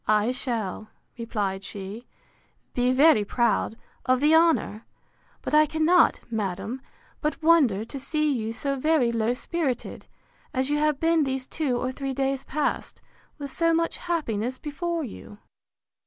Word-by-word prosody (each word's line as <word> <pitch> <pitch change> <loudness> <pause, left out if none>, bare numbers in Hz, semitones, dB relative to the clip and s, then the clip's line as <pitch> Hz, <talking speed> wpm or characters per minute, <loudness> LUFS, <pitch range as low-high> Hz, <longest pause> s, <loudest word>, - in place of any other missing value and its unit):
—I 215 +2 +3
shall, 225 -5 -3 0.3
replied 205 -5 -3
she, 200 +5 -8 0.7
be 245 0 +2
very 270 -4 +5
proud 230 +1 0 0.3
of 255 -1 +2
the 300 +3 +4
honour: 320 -9 +3 0.6
But - - -4
I 305 0 +6
cannot, 320 +3 +3
madam, 215 +3 -3 0.4
but 305 0 -2
wonder 275 -11 +4
to 275 +4 -7
see 305 +2 0
you 225 -3 -2
so 275 +4 -2
very 305 -4 +2
low 230 +1 0
spirited, 275 -3 -3 0.5
as 260 +2 0
you 295 - +2
have 300 -2 +1
been 330 -1 +3
these 265 -1 -2
two 275 -5 -1
or 255 +1 -2
three 270 0 -4
days 270 0 -1
past, 300 +2 -2 0.4
with 285 -2 -6
so 330 +3 +2
much 335 0 0
happiness 255 -8 -2
before 330 +3 -3
you. 210 -4 -9
265 Hz, 145 wpm, -26 LUFS, 230-305 Hz, 0.7 s, I